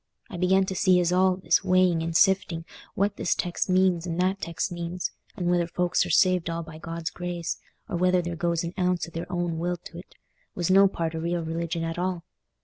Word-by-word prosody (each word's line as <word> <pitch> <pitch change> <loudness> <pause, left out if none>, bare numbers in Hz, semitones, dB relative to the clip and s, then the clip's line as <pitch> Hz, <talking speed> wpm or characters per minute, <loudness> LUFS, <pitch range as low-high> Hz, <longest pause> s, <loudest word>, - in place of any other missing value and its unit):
I 180 - -5
began 190 +2 +3
to 190 - -3
see 185 -1 +4
as 175 0 +1
all 185 0 +4
this 190 - +2
weighing 185 -3 +3
and 165 0 0
sifting 185 -3 +2 0.3
what 200 +1 0
this - - +1
text 175 +1 -2
means 185 -2 +2
and 170 0 -3
that 190 +2 +1
text 170 +1 -3
means, 175 +1 -4 0.3
and 180 - -3
whether 175 -1 +2
folks 180 +1 0
are - - -7
saved 180 0 +3
all 165 0 -3
by 160 -1 -11
God's 165 0 -5
grace, 175 -1 -4 0.3
or - - -3
whether 180 +1 +3
there 175 -1 -3
goes 170 0 0
an 170 +1 -4
ounce 180 -1 +1
o' - - -12
their 165 +2 -6
own 175 -2 -2
will 175 +1 -1
to't, 175 +1 -12 0.4
was 175 0 0
no 195 +1 +7
part 165 -4 -3
o' 160 - -3
real 170 +1 -1
religion 165 +1 -3
at 165 +1 -3
all. 180 -2 -2
175 Hz, 220 wpm, -26 LUFS, 170-185 Hz, 0.4 s, no